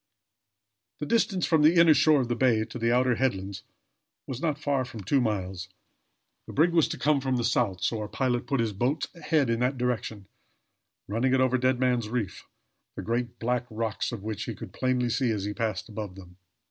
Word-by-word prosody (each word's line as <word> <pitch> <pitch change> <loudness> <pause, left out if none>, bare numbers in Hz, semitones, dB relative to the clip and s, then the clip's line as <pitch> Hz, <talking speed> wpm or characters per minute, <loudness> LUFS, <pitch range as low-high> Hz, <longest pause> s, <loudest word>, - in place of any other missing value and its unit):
The 150 - -4
distance 190 -1 +1
from 160 -2 +3
the 155 +3 +5
inner 165 -2 +7
shore 150 0 +4
of 125 - -2
the 120 - -1
bay 115 -3 +2
to 125 - -8
the 115 +1 +1
outer 125 +1 +3
headlands 100 -6 -1 0.6
was 130 0 -6
not 155 -4 0
far 145 -3 0
from 115 -4 -8
two 135 +8 +2
miles. 95 -5 -2 0.8
The - - -8
brig 165 +4 +4
was 165 -3 +4
to - - -5
come 150 -1 +2
from 130 -1 0
the 120 - 0
south, 110 -6 0
so 110 +4 0
our 105 - -4
pilot 125 +1 -1
put 135 - 0
his 110 -2 -1
boat's 125 +9 -1
head 155 -5 +2
in 115 - 0
that 125 +2 0
direction, 115 -4 -2 0.8
running 125 +6 +1
it - - +2
over 130 0 +2
Dead 130 0 +2
Man's 125 -4 +1
Reef, 110 -6 -4 0.5
the - - -5
great 120 +1 -2
black 120 +1 -1
rocks 110 -1 -2
of 115 -5 -6
which 105 -1 -4
he - - -5
could - - -9
plainly 125 -1 0
see 130 0 +1
as 105 -3 -1
he 105 +1 -3
passed 110 -4 -2
above 105 -4 -6
them. 90 -2 -13
120 Hz, 210 wpm, -27 LUFS, 110-130 Hz, 0.8 s, inner